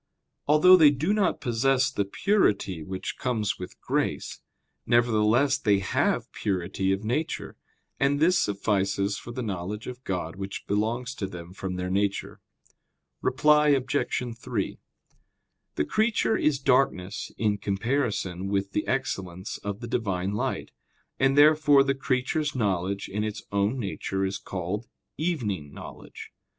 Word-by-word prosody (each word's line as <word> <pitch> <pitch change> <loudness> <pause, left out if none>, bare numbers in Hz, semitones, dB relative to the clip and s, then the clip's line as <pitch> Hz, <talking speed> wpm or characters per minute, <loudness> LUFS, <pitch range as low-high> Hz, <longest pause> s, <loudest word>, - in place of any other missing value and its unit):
Although 155 +5 +7
they 155 -4 +8
do 150 +8 0
not 210 -2 +1
possess 130 +3 +2
the 100 - -1
purity 100 - +1
which 95 +4 -5
comes 110 -6 -1
with 90 - -8
grace, - - -2 0.5
nevertheless 120 +4 +3
they 105 -6 +3
have 95 -1 0
purity 95 0 -1
of 95 +2 -1
nature; 135 +9 -2 0.4
and 140 +1 +2
this 175 +3 +4
suffices 100 0 0
for 120 - -9
the 125 +1 -4
knowledge 100 +1 -4
of 125 0 -8
God 90 -4 -3
which 100 0 -6
belongs 115 +5 -1
to 100 - -4
them 90 -1 -9
from 95 -1 -4
their 90 0 -3
nature. 100 +1 -1 0.8
Reply 150 0 +4
Obj. 140 -1 +2 0.4
3: 120 -4 -3 1.0
The 75 - 0
creature 220 - +1
is 150 -7 +2
darkness 125 -8 +1
in 105 -2 +1
comparison 100 -3 -1
with 100 0 -1
the 105 - -2
excellence 95 -8 -3
of 100 +2 -5
the 120 - -5
Divine 100 -5 -1
light; 105 - -2 0.5
and 135 +1 +3
therefore 150 -1 +6
the 135 0 +1
creature's 135 +3 -1
knowledge 100 -4 -1
in 105 +2 -2
its 110 -1 -4
own 100 +5 +1
nature 95 -3 -2
is 95 +1 -3
called 95 +5 -4 0.3
"evening" 110 - -2
knowledge. - - -10
105 Hz, 140 wpm, -27 LUFS, 95-135 Hz, 1.0 s, they